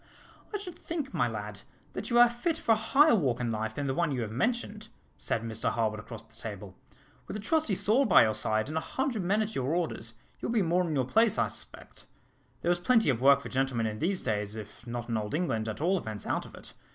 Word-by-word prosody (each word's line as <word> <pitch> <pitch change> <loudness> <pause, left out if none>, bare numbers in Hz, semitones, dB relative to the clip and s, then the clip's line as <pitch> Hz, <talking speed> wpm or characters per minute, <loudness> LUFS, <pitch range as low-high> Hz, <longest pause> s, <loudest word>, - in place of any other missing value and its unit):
"I 420 - -1
should 365 -4 -9
think, 305 -5 -4
my - - +2
lad, - - -6 0.3
that - - -5
you 240 - +2
are 240 0 +9
fit 240 +8 -2
for 235 - 0
a - - +7
higher 270 +7 +4
walk 140 - +1
in 120 -2 -1
life 110 0 -3
than 145 - -2
the 135 - 0
one 160 +1 0
you 125 -3 -1
have 110 - -5
mentioned," 215 - -2 0.3
said 115 - -2
Mr 110 -1 -1
Harwood 110 -2 -1
across 115 +1 -9
the 110 0 -26
table. 100 -4 -7 0.5
"With - - -4
a - - -6
trusty 240 0 +1
sword 230 +7 +2
by - - +8
your 110 -1 +2
side, 110 +1 0
and 155 +2 -1
a - - -7
hundred 255 -3 -2
men 205 +5 +2
at 215 +1 -5
your 135 +5 -1
orders, 120 -10 -3 0.2
you - - -3
would 230 - -1
be 215 - +4
more 175 +1 +1
in 155 - -2
your 130 -2 +1
place, 220 - +3
I - - +2
suspect. - - -9 0.6
There 175 - +3
is 175 - +1
plenty 225 - +4
of 120 -2 -3
work 140 +1 +6
for - - -7
gentlemen 130 -3 0
in 110 -1 -3
these 185 +2 0
days, 105 -2 -2
if 110 +2 -10
not 120 0 -4
in 115 -2 -1
Old 105 +4 -3
England, 115 -10 -1
at 110 +3 -6
all 185 +3 +2
events 110 -6 -6
out - - -1
of - - -13
it. - - -12
145 Hz, 250 wpm, -29 LUFS, -, 0.6 s, are